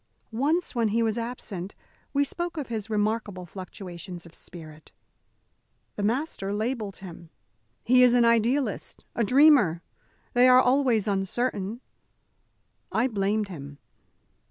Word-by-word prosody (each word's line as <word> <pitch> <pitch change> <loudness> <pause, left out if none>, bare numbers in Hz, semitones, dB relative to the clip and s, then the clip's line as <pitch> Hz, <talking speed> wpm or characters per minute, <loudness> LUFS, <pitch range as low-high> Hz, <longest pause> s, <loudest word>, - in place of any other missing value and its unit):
Once, 295 +10 0
when 235 -2 +1
he 230 +2 +1
was 220 -1 0
absent, 230 -6 -6 0.4
we 285 0 +2
spoke 345 +4 -3
of 290 -5 -4
his 220 -2 -4
remarkable 210 -3 -1
fluctuations 180 -1 -8
of 170 - -15
spirit. 155 -3 -13 1.0
The - - -4
master 210 -3 -1
labelled 215 -2 -3
him. 175 -3 -11 0.5
"He 250 +1 +5
is 250 -1 +6
an 240 -1 +4
idealist, 235 +1 0
a 235 - 0
dreamer. 250 - +5 0.5
They 245 +1 +5
are 255 0 +7
always 250 -4 +2
uncertain." 200 +2 -1 1.1
I 245 +4 +1
blamed 205 -1 -1
him. 145 -5 -9
220 Hz, 125 wpm, -26 LUFS, 195-250 Hz, 1.1 s, are